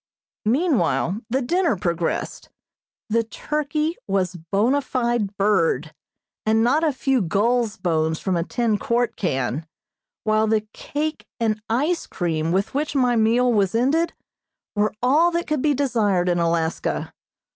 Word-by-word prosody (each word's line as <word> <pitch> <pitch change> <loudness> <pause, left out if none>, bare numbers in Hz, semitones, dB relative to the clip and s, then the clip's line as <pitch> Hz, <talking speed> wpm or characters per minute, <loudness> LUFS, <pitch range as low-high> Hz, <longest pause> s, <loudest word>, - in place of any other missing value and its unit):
Meanwhile 230 - +1
the 260 +3 0
dinner 345 - +1
progressed. 170 -2 -2 0.6
The 230 +2 +3
turkey 300 +6 -2
was 190 -2 0
bona 205 - +1
fide 240 -6 -1
bird, 165 -7 +1 0.5
and 220 +1 +3
not 285 +7 +3
a 315 - +3
few 265 -1 +1
gull's 220 +5 +1
bones 160 -3 0
from 190 -2 -1
a 170 - +1
tin 220 +2 0
quart 240 +1 0
can, 135 - -2 0.6
while 215 0 +2
the 215 0 +2
cake 305 +2 -4
and 215 -2 0
ice 295 +10 0
cream 165 -2 -1
with 195 +3 0
which 290 +2 -2
my 250 -3 +3
meal 235 +2 +3
was 200 -2 +1
ended, 305 +8 +2 0.6
were 210 +1 +1
all 300 +7 +4
that 340 0 0
could 305 -3 -1
be 295 0 +2
desired 215 -9 +1
in 175 0 +1
Alaska. 165 -1 -1
225 Hz, 140 wpm, -23 LUFS, 185-270 Hz, 0.6 s, all